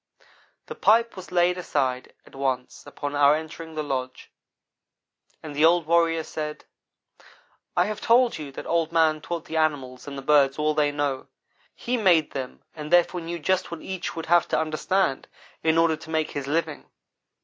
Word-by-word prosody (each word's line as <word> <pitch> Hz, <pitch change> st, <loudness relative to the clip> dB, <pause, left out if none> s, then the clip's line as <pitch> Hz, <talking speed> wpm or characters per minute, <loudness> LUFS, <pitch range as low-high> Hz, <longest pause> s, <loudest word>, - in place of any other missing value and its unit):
The -, -, -7 dB
pipe 230 Hz, +2 st, +3 dB
was 185 Hz, -2 st, -10 dB
laid 180 Hz, 0 st, +2 dB
aside 130 Hz, -7 st, -2 dB
at -, -, -19 dB
once 130 Hz, -2 st, -3 dB
upon 145 Hz, -1 st, -5 dB
our 145 Hz, +1 st, +5 dB
entering 160 Hz, +1 st, -7 dB
the 155 Hz, -, -2 dB
lodge 130 Hz, -3 st, -5 dB, 1.1 s
and 150 Hz, -2 st, -7 dB
the 150 Hz, -, +1 dB
old 170 Hz, 0 st, +5 dB
warrior 165 Hz, 0 st, +2 dB
said: 150 Hz, -1 st, -6 dB, 1.1 s
"I 175 Hz, -, +4 dB
have 210 Hz, +1 st, -4 dB
told 240 Hz, -4 st, +3 dB
you 145 Hz, -2 st, -7 dB
that -, -, -7 dB
Old 165 Hz, -1 st, 0 dB
man 160 Hz, -2 st, +2 dB
taught 170 Hz, 0 st, -5 dB
the 160 Hz, -, -4 dB
animals 140 Hz, -5 st, -1 dB
and 140 Hz, -1 st, -6 dB
the 135 Hz, -, -7 dB
birds 140 Hz, -1 st, +4 dB
all 155 Hz, 0 st, +1 dB
they 150 Hz, -1 st, +2 dB
know. 145 Hz, -2 st, -2 dB, 0.5 s
He 245 Hz, +1 st, -2 dB
made 175 Hz, -8 st, +3 dB
them 130 Hz, -2 st, -6 dB
and 150 Hz, -1 st, -8 dB
therefore 175 Hz, 0 st, +3 dB
knew 170 Hz, +1 st, -5 dB
just 185 Hz, +3 st, 0 dB
what 170 Hz, -1 st, -7 dB
each 190 Hz, -2 st, -5 dB
would 165 Hz, -, -5 dB
have 175 Hz, 0 st, +3 dB
to -, -, +1 dB
understand 155 Hz, 0 st, 0 dB, 0.3 s
in 160 Hz, 0 st, +2 dB
order 165 Hz, -1 st, +4 dB
to 160 Hz, +1 st, -13 dB
make 160 Hz, -1 st, -1 dB
his 140 Hz, -1 st, -5 dB
living. 160 Hz, 0 st, -2 dB
160 Hz, 180 wpm, -25 LUFS, 145-170 Hz, 1.1 s, our